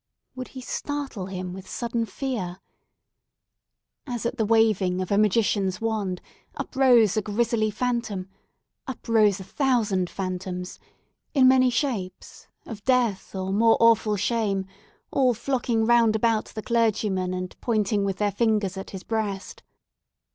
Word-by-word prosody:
Would 255 -1 -6
he 260 - -9
startle 275 -7 -4
him 185 -1 -5
with 190 0 -10
sudden 235 -1 -2
fear? 195 -6 -4 1.5
As 240 -3 -4
at 240 +2 -2
the 220 -3 0
waving 215 -5 +3
of 185 0 -3
a 200 - +3
magician's 205 -3 +2
wand, 210 -5 -2 0.3
up - - -6
rose 245 -6 +5
a - - +3
grisly 215 +1 0
phantom—up 220 +1 -5
rose 215 -3 +4
a - - -7
thousand 215 -7 0
phantoms—in 185 +8 -3
many 255 -1 +5
shapes, 230 -8 -3 0.2
of 210 -3 -8
death, 240 -7 +1
or 190 0 -2
more 225 +2 +4
awful 225 -2 +4
shame, 205 -2 0 0.5
all 255 -3 +3
flocking 235 -2 0
round 230 -2 +4
about 220 0 +1
the 215 - -8
clergyman, 210 -5 +1
and 185 0 -5
pointing 210 -3 +1
with 195 -1 -1
their 205 -1 +1
fingers 210 -3 0
at 195 - -6
his 190 -2 -8
breast! 210 -3 -3
215 Hz, 135 wpm, -25 LUFS, 190-235 Hz, 1.5 s, rose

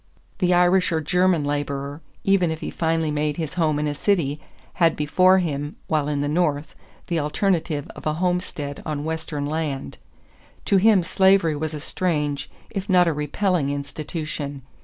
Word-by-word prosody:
The 180 -1 +2
Irish 180 +1 +4
or 160 - +1
German 180 +1 +2
laborer, 145 0 -3 0.2
even 195 -3 +3
if 160 0 -4
he - - -4
finally 160 -1 0
made 150 0 -1
his 160 -4 -3
home 155 -4 +1
in 150 - -1
a 145 - -1
city, 150 -4 0 0.4
had 165 -1 +5
before 185 +5 +4
him, 145 -4 -2
while 150 -3 0
in 145 -1 -1
the 145 - 0
North, 150 -1 0 0.3
the 170 -2 -1
alternative 160 -1 0
of - - -6
a 155 - +1
homestead 175 -5 -2
on 150 -2 -3
Western 160 -2 -3
land. 150 -2 -3 0.7
To 200 - +4
him 200 -1 +5
slavery 190 -2 +3
was 155 +1 -3
a - - -5
strange, 150 -3 -2 0.2
if 195 -1 -4
not 180 -2 +5
a 165 - +2
repelling, 150 +1 0
institution. 145 0 -5
155 Hz, 165 wpm, -23 LUFS, 145-180 Hz, 0.7 s, had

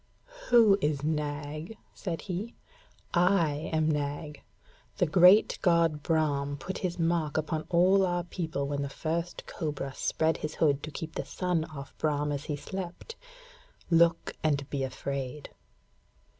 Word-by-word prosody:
'Who 220 -5 +6
is 145 -1 0
Nag?' 150 +4 -3 0.2
said 170 -5 -4
he. 200 +5 -5 0.6
'I 170 -4 +2
am 155 -1 +2
Nag. 150 0 -2 0.6
The 180 - +3
great 180 +5 +6
god 170 -4 +3
Brahm 145 -3 0
put 185 +7 -5
his 180 -2 -2
mark 165 -3 0
upon 155 0 -2
all 185 +3 +4
our 175 -1 0
people 160 -5 -3
when 140 0 -2
the 140 - -3
first 165 +4 -3
cobra 145 -5 -4
spread 160 +4 0
his 150 0 -5
hood 145 -3 +2
to 155 - -6
keep 160 +1 -6
the - - -3
sun 180 -3 -1
off 140 -4 -10
Brahm 150 -1 0
as 145 0 -3
he 150 - -2
slept. 190 - -7 0.8
Look, 170 0 +3
and 140 -3 0
be 140 - -1
afraid!' 135 +1 -4
155 Hz, 145 wpm, -29 LUFS, 145-175 Hz, 0.8 s, Who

